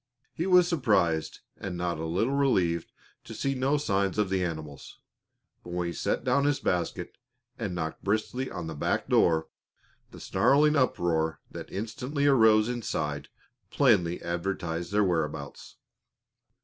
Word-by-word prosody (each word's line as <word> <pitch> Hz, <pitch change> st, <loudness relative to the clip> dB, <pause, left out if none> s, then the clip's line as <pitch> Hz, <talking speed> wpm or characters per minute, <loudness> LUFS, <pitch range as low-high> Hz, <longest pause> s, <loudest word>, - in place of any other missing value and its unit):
He 170 Hz, -, -2 dB
was 180 Hz, -2 st, +6 dB
surprised 100 Hz, -, +1 dB, 0.2 s
and 95 Hz, -3 st, -5 dB
not 85 Hz, -2 st, -2 dB
a 80 Hz, -, -3 dB
little 105 Hz, +11 st, 0 dB
relieved 95 Hz, -12 st, +1 dB, 0.3 s
to -, -, -9 dB
see 135 Hz, -, -1 dB
no 135 Hz, +3 st, +1 dB
signs 100 Hz, -9 st, 0 dB
of 105 Hz, -3 st, +1 dB
the 95 Hz, -1 st, +1 dB
animals, 80 Hz, -4 st, -6 dB, 0.7 s
but 85 Hz, -, -8 dB
when 90 Hz, 0 st, -1 dB
he 85 Hz, -, -3 dB
set -, -, -1 dB
down 130 Hz, +3 st, +2 dB
his 145 Hz, -1 st, +1 dB
basket 90 Hz, -3 st, -2 dB, 0.4 s
and 100 Hz, -6 st, -3 dB
knocked 80 Hz, -2 st, -4 dB
briskly 110 Hz, +6 st, -1 dB
on 90 Hz, -3 st, -6 dB
the 80 Hz, -, -5 dB
back 75 Hz, -, -1 dB
door, 80 Hz, -1 st, +3 dB, 0.6 s
the -, -, -12 dB
snarling 150 Hz, +2 st, +3 dB
uproar 85 Hz, -, +1 dB
that -, -, -8 dB
instantly 125 Hz, +8 st, -3 dB
arose 110 Hz, -6 st, +5 dB
inside 75 Hz, -12 st, -3 dB, 0.4 s
plainly 100 Hz, -, +3 dB
advertised 85 Hz, -1 st, -3 dB
their 105 Hz, +1 st, +3 dB
whereabouts. 80 Hz, -6 st, -3 dB
95 Hz, 145 wpm, -28 LUFS, 85-130 Hz, 0.7 s, was